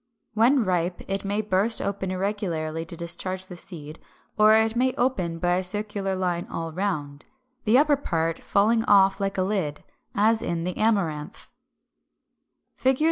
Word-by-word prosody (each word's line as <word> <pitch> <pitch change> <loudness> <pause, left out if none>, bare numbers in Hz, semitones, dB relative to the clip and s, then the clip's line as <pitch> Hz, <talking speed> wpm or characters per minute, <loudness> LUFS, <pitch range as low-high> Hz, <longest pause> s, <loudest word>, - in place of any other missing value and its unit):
When 235 +3 +4
ripe 180 -1 -1
it 195 0 -2
may 205 +2 -1
burst 210 +2 +1
open 195 -1 -3
irregularly 180 -5 -2
to 165 +1 -7
discharge 185 +2 -3
the 180 - -10
seed; 155 -3 -9 0.4
or 215 0 +6
it 220 +1 +2
may 255 +1 +1
open 190 -10 0
by 175 +1 +1
a 185 - -1
circular 200 0 -2
line 180 -2 -2
all 165 -1 -5
round, 150 -7 -3 0.4
the 225 +3 +5
upper 290 0 +4
part 165 - -1
falling 225 +3 +2
off 195 -1 +4
like 195 0 -1
a 185 - +2
lid; 185 -7 -2 0.3
as 220 +2 +3
in 170 -1 -2
the 180 +1 -3
Amaranth 180 -9 -1 1.2
(Fig. 260 0 +1
190 Hz, 155 wpm, -25 LUFS, 170-215 Hz, 1.2 s, or